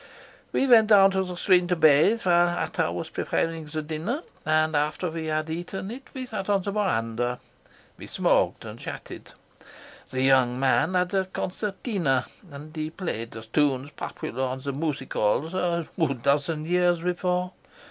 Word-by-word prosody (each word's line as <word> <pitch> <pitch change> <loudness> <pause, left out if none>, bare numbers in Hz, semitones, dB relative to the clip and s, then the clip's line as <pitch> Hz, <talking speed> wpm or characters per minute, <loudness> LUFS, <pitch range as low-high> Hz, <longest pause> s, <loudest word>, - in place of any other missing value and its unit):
"We - - +2
went 230 -4 +6
down 195 -2 +7
to 190 0 +1
the 180 -1 -6
stream 180 -1 +3
to 180 - +1
bathe 160 +8 +4
while 175 -1 +4
Ata 175 - -1
was - - -5
preparing 165 -1 -2
the 155 +1 -4
dinner, 160 - -3 0.2
and 155 0 +2
after 150 +4 0
we 160 -1 -4
had 155 0 -1
eaten 175 +5 -5
it 265 +3 -10
we 260 -1 -4
sat 210 -5 -5
on 200 -2 +2
the 200 - -2
verandah. 120 - -1 0.6
We - - -9
smoked - - +1
and - - -8
chatted. - - -8 0.8
The 130 0 -1
young 130 -2 +4
man 135 +7 +2
had 180 +1 +1
a 190 -1 +2
concertina, 185 - -1 0.2
and 150 +2 -11
he 155 0 -3
played 160 - -4
the 110 0 -9
tunes 135 +3 0
popular 130 -3 -5
on 130 0 -3
the 140 0 -3
music 145 -2 -3
halls 140 - +1
a 170 -3 -1 0.4
dozen 150 +2 +1
years 175 0 +2
before. 180 0 -1
165 Hz, 165 wpm, -26 LUFS, 145-185 Hz, 0.8 s, down